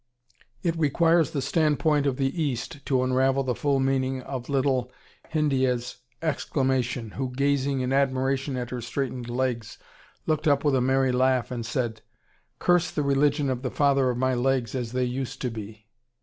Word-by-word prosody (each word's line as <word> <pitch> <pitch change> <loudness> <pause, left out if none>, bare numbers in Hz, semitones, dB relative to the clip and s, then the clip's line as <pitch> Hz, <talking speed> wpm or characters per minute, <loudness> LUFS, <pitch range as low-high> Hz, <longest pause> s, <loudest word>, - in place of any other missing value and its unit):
It 170 -1 +1
requires 165 +2 +3
the 145 -5 -3
standpoint 150 0 +2
of 130 -2 0
the 135 +5 -1
East 140 -1 -3
to 130 -2 +2
unravel 130 +1 +2
the 130 -1 0
full 140 +3 +1
meaning 130 -1 0
of 125 -2 -6
little 130 -2 +1 0.4
Hindiyeh's 130 -6 0 0.3
exclamation, 130 -6 -1
who, 130 +3 -3
gazing 140 0 0
in 130 +1 -1
admiration 135 0 +1
at 125 -1 -4
her 125 -1 -4
straightened 125 0 -3
legs, 120 -2 -2 0.5
looked 155 0 0
up 140 -1 +3
with 145 - +3
a 130 - +3
merry 130 +1 +2
laugh 130 0 +2
and 120 -2 -3
said: 120 -2 -2 0.6
"Curse 175 0 +2
the 150 - -2
religion 140 +1 +2
of 130 -2 -1
the 130 - -2
father 140 -1 +2
of 125 - -1
my 130 +1 +1
legs 125 -2 0
as 120 -3 -3
they 125 0 +1
used 130 +1 -4
to 125 - -1
be!" 110 -1 -8
130 Hz, 170 wpm, -26 LUFS, 125-140 Hz, 0.6 s, requires